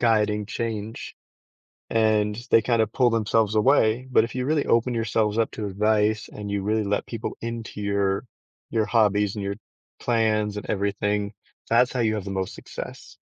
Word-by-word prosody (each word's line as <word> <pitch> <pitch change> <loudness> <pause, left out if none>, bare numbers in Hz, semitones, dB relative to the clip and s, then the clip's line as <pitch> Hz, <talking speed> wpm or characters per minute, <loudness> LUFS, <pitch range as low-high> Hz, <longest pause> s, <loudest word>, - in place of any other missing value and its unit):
guiding 105 -3 +2
change, 110 -2 -4 0.8
and 110 -2 +2
they 115 - +6
kind 115 -1 +2
of 110 - -2
pull 125 -2 +3
themselves 110 -1 +1
away. 120 +1 +3
But 115 - +5
if 115 - -7
you 125 - -1
really 155 -1 +1
open 120 +2 +2
yourselves 110 -1 0
up 115 - +2
to 110 - -5
advice 105 +2 +1
and 105 -1 -6
you 100 -1 -1
really 110 +1 0
let 100 +1 -1
people 115 -2 -5
into 115 -2 -5
your 100 +1 0 0.5
your 110 -1 +1
hobbies 105 -3 +2
and 105 - -4
your 100 0 -2 0.5
plans 110 -3 +1
and - - -7
everything, 100 +1 -1 0.4
that's 125 +2 +4
how 125 - 0
you 110 -2 +2
have 100 - -4
the 100 - -5
most 95 -1 -3
success. - - -9
110 Hz, 175 wpm, -25 LUFS, 105-115 Hz, 0.8 s, they